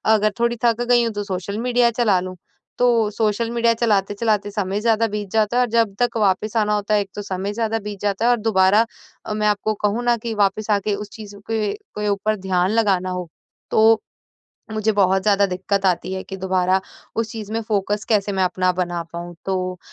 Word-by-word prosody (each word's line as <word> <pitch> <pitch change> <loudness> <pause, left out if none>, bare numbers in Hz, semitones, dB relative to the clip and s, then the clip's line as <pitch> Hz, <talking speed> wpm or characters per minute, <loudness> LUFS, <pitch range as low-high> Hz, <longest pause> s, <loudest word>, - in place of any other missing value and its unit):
अगर 215 0 +2
थोड़ी 235 0 +1
थक 235 0 +2
गई 240 0 +3
हूँ, 230 -1 -1
तो 205 0 -3
सोशल 200 +1 -4
मीडिया 245 +1 +2
चला 220 -5 +2
लूँ। 185 0 -6 0.4
तो 235 -3 +3
सोशल 220 +2 0
मीडिया 235 -1 +2
चलाते-चलाते 210 -1 +1
समय 200 -1 -2
ज़्यादा 225 0 +2
बीत 205 -2 -4
जाता 220 +1 +1
है - - +5
और 245 - +1
जब 225 -3 +2
तक 240 -1 +1
वापस 210 +1 +1
आना 210 -1 +2
होता 210 +1 -1
है 210 - +4
एक 195 - -6
तो 205 - -4
समय 195 0 -4
ज़्यादा 225 0 -1
बीत 205 -1 -7
जाता 205 +2 0
है 245 - +5
और 245 - +3
दोबारा 210 0 +4 0.4
अ, - - -3
मैं 210 0 0
आपको 210 +1 +1
कहूँ 210 +4 +1
ना 240 0 +3
कि 230 0 -4
वापस 205 +1 +1
आके 205 0 +1
उस 210 +1 -7
चीज़ 210 -2 -10
के 220 -2 0
के, 305 - -6
ऊपर 205 +2 0
ध्यान 185 -1 0
लगाना 200 -5 +2
हो, 180 -1 -4 0.4
तो 220 0 +5 0.7
मुझे 215 0 +1
बहुत 190 -2 +2
ज़्यादा 200 -1 +3
दिक्कत 195 +2 -2
आती 185 0 0
है 190 0 -3
कि 195 - -7
दोबारा 185 0 +1 0.4
उस 225 -1 -1
चीज़ 215 -2 -7
में 225 - -1
फोकस 205 0 0
कैसे 205 -2 +1
मैं 190 -1 +1
अपना 185 0 +1
बना 175 -1 -2
पाऊँ? 175 +1 -7
तो 185 -1 -2
210 Hz, 210 wpm, -21 LUFS, 195-225 Hz, 0.7 s, है